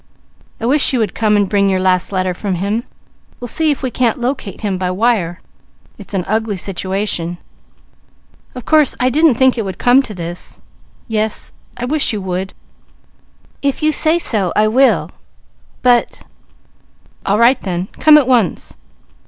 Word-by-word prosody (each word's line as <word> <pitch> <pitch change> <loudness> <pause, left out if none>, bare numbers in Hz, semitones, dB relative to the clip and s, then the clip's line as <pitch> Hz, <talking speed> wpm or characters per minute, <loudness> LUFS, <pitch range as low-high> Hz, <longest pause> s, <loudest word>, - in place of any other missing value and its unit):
I 230 - -4
wish 275 +3 +3
you - - +2
would 220 -5 -1
come 215 -2 +1
and 205 -1 +2
bring 200 0 +2
your 190 -1 +1
last 185 0 +1
letter 185 -1 -1
from 190 +1 -3
him. 205 +6 -2 0.5
We'll 245 - -6
see 315 +6 +1
if 285 -2 -1
we 260 - -2
can't 240 -2 0
locate 245 -5 -4
him 200 -4 -2
by 185 -1 -1
wire. 185 -3 0 0.6
It's 205 0 -7
an 180 -2 -1
ugly 220 -1 -1
situation. 185 -2 -3 1.2
Of 250 - -8
course 305 -3 +3
I 255 +1 +2
didn't 305 -1 +4
think 260 0 +3
it - - +1
would 190 -3 -6
come 245 +2 +4
to 220 -6 -8
this. 175 0 -7 0.5
Yes 220 -2 -2 0.2
I 245 - -3
wish 290 -1 0
you 210 - -2
would! 185 +1 -4 1.1
If 280 +2 -1
you 310 - +3
say 315 +2 +2
so, 210 - 0
I 215 0 +3
will, 260 +5 +2 0.7
but 245 -1 +2 1.0
All 200 - +1
right 240 +3 +4
then. 180 -2 -3
Come 310 -1 +7
at 285 -4 +2
once! 240 -8 +1
215 Hz, 165 wpm, -16 LUFS, 190-255 Hz, 1.2 s, Come